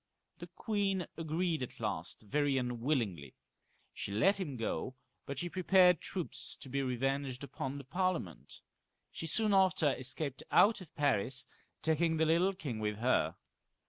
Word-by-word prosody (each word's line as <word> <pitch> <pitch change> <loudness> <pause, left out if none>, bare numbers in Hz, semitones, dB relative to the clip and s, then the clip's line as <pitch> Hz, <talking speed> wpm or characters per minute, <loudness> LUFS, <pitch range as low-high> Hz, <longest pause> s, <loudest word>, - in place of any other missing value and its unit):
The - - -7
queen 200 -4 -1
agreed 165 0 -1
at 125 - -6
last, - - -3
very 145 +5 +1
unwillingly; 120 - -1 0.6
she - - -5
let 195 - +3
him 145 -9 -4
go, 125 +3 -3 0.3
but 140 - -4
she 175 - -2
prepared 180 -1 +4
troops 180 -4 -4
to 135 - -10
be 140 +2 0
revenged 135 +1 -1
upon 140 0 -4
the 140 - -7
Parliament. 170 - -2 0.5
She 165 - -5
soon 215 +5 +2
after 185 -6 +4
escaped 130 +2 -3
out 210 0 +5
of 175 - -13
Paris, 130 -2 +1 0.4
taking 160 +1 +2
the 160 - +3
little 170 +5 +3
king 145 - -5
with 105 -1 -2
her. 125 +4 +2
145 Hz, 145 wpm, -33 LUFS, 125-180 Hz, 0.6 s, out